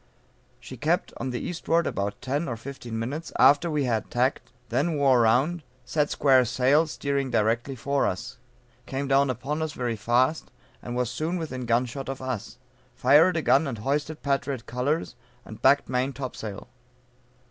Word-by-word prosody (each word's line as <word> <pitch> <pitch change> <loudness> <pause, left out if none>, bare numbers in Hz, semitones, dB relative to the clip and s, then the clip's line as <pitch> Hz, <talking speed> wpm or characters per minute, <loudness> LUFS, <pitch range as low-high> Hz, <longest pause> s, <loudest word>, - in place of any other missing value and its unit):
She 125 +1 -10
kept 155 +8 0
on - - -4
to 130 - -3
the 120 - -2
eastward 170 -1 0
about 100 +1 -2
ten 145 +6 -1
or 120 - -3
fifteen 120 -2 -7
minutes 140 +9 -4
after 145 +6 +5
we 150 -2 0
had 115 -4 -1
tacked, 125 +3 0 0.2
then 145 +8 0
wore 135 -4 +4
round, 135 +10 +2 0.2
set 150 +2 0
square 130 -3 +4
sail, 130 +6 +3
steering 140 -3 -2
directly 115 +3 0
for 140 +3 0
us, 90 - -5 0.5
came 140 +1 -3
down 135 0 +3
upon 135 +5 -3
us 160 -1 -2
very 120 -3 -2
fast, 125 +8 +1 0.3
and 120 - -6
was 125 -1 -1
soon 165 +6 -2
within 130 -7 -5
gun 120 +2 +2
shot 135 +3 -6
of 135 - -4
us, 130 -5 -5 0.4
fired 165 +4 +5
a 160 - -1
gun 140 +3 +4
and 125 -4 -4
hoisted 145 +7 -2
patriot 135 -3 -1
colors 135 +8 -1 0.3
and 110 - -11
backed 140 +2 +4
main 130 +2 -1
topsail. 110 -7 -6
135 Hz, 170 wpm, -26 LUFS, 120-145 Hz, 0.5 s, after